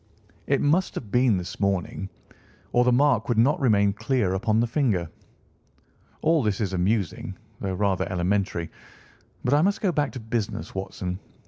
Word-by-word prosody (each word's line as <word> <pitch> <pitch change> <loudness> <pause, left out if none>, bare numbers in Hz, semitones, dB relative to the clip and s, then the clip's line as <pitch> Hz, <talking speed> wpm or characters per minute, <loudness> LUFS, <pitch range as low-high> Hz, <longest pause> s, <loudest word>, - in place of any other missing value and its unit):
It - - +2
must 165 +6 +2
have 105 -5 -6
been 125 -4 +3
this 90 +1 -6
morning, 100 0 -1 0.6
or 120 - +4
the 125 - +3
mark 140 +2 +3
would 120 - +1
not 135 +7 +4
remain 100 -7 +3
clear 105 -3 0
upon 110 +3 +1
the 120 - +3
finger. 115 - 0 1.2
All 160 0 +4
this 105 -4 0
is 100 -4 -1
amusing, 95 0 -1 0.2
though 95 -1 -2
rather 95 -1 0
elementary, 90 -2 -1 0.7
but 125 - +2
I 145 - +5
must 200 +4 +2
go 195 - +1
back 145 -4 0
to 130 - -5
business, 110 -1 -3
Watson. 95 -1 -4
110 Hz, 160 wpm, -25 LUFS, 95-130 Hz, 1.2 s, I